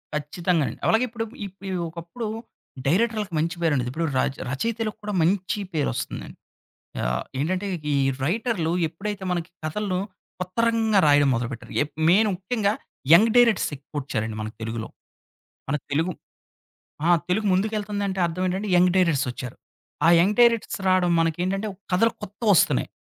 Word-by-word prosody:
ఖచ్చితంగా 165 +3 0
అండి. - - -6
అలాగే 225 +3 +4
ఇప్పుడు 225 0 -4 0.2
ఇప్పు 195 +1 -18
ఈ - - -2 0.2
ఒకప్పుడు 170 +8 -6 0.6
డైరెక్టర్లకు 210 +2 +1
మంచి 165 +2 -1
పేరు 165 -3 +2
అండి. 125 -3 0
ఇప్పుడు 160 +6 -2
ర - - +3 0.3
రచయితలకు 220 - -2
కూడా 210 0 -3
మంచి 190 +5 +1
పేరోస్తుందండి. 145 -5 -3 0.7
ఆహ్, - - 0 0.2
ఏంటంటే 185 +6 -1 0.3
ఈ - - +2 0.3
రైటర్లు 185 - 0 0.2
ఎప్పుడైతే 195 +4 -5
మనకి 175 0 -3
కథలను 185 +3 -1 0.4
పత్తరంగా 220 +3 +1
రాయడం 145 -1 +5
మొదలుపెట్టారు. 115 0 -4
ఎప్ 150 0 -6
మెయిన్ 210 +5 +5
ముఖ్యంగా 200 +2 0 0.4
యంగ్ 220 +6 +6
డైరెక్టర్స్ 235 -5 +4
ఎక్కువొచ్చారండి 130 -6 -4
మనకు 110 0 -6
తెలుగులో. 115 0 -4 0.8
మన 145 - +1 0.2
తెలుగు 165 +5 +1 0.9
ఆ! 175 - +5 0.2
తెలుగు 210 +4 +1
ముందుకెళ్తుందంటే, 205 -1 -1
అర్థం 170 +2 -2
ఏంటంటే 190 +3 -2
యంగ్ 180 0 +5
డైరెక్ట్స్ 165 -7 +3
వచ్చారు. 125 0 -6 0.5
ఆ - - +7
యంగ్ 195 +5 +3
డైరెక్టర్స్ 235 -3 +3
రావడం 185 -1 +3
మనకేంటంటే 180 +5 -1
ఒక - - -21 0.2
కథలు 230 +5 +4
కొత్తవొస్తున్నాయి. 205 - +2
180 Hz, 140 wpm, -24 LUFS, 155-210 Hz, 0.9 s, ఆ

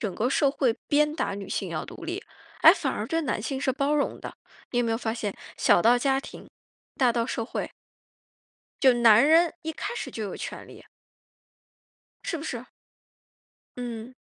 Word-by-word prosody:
整 205 -5 -2
个 230 +6 0
社 275 +1 +3
会 255 -5 +1
鞭 300 +1 +3
打 310 - -2
女 200 0 -7
性 195 - -2
要 155 -2 -4
独 345 - -10
立， 355 +4 -4 0.4
哎， - - +10
反 - - -2
而 - - -3
对 330 -1 0
男 270 - -2
性 265 +5 -3
是 270 - +1
包 280 +2 0
容 290 - 0
的。 - - -7 0.4
你 245 - -1
有 245 - +2
没 230 - -1
有 225 - +1
发 225 -1 -2
现， 210 -4 -4 0.2
小 175 - +4
到 245 +2 +5
家 270 +1 +2
庭， 275 - -10 0.5
大 250 -3 +3
到 230 -1 0
社 230 -3 -3
会。 - - -4 1.1
就 265 -3 +7
男 235 0 +6
人 330 +2 +5
一 320 - -4
开 475 - -5
始 - - -5
就 220 - -5
有 200 - -5
权 - - -7
利。 - - -14 1.4
是 - - -2
不 - - -7
是？ 245 -5 -5 1.1
嗯。 240 0 -6
250 Hz, 205 characters per minute, -26 LUFS, 225-290 Hz, 1.4 s, 哎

